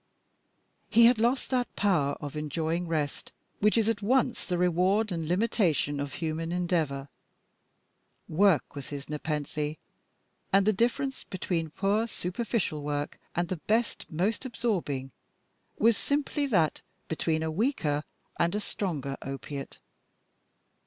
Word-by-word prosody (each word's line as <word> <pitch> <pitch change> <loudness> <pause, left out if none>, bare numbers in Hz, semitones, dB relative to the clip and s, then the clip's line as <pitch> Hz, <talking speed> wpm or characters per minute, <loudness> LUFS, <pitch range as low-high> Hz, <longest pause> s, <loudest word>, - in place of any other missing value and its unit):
He 230 +1 +7
had 235 -1 +6
lost 245 +5 +1
that 250 -1 0
power 170 -9 +2
of 145 -1 -6
enjoying 160 +3 -1
rest 150 -3 -2 0.3
which 210 +2 +4
is 220 -2 +3
at 225 -2 +1
once 250 +3 +2
the 180 - 0
reward 185 +5 +3
and 165 -3 -2
limitation 175 - +1
of 140 0 -3
human 165 0 -2
endeavour. 165 -6 0 1.2
Work 180 -2 +3
was 140 -2 -7
his 140 -1 -6
nepenthe, 150 0 -2 0.7
and 195 0 +5
the 215 - +4
difference 245 +5 0
between 170 -3 -2
poor, 200 +7 +1
superficial 185 -5 -2
work 145 0 -3 0.2
and 175 0 +1
the 185 - -2
best, 225 +8 0
most 185 +9 0
absorbing, 180 - -2 0.7
was 225 -1 +4
simply 285 0 0
that 170 - +2 0.3
between 160 0 0
a 160 - -1
weaker 155 - 0 0.4
and 170 +3 +2
a - - +1
stronger 150 -10 -3
opiate. 135 +1 -6
175 Hz, 130 wpm, -29 LUFS, 150-215 Hz, 1.2 s, He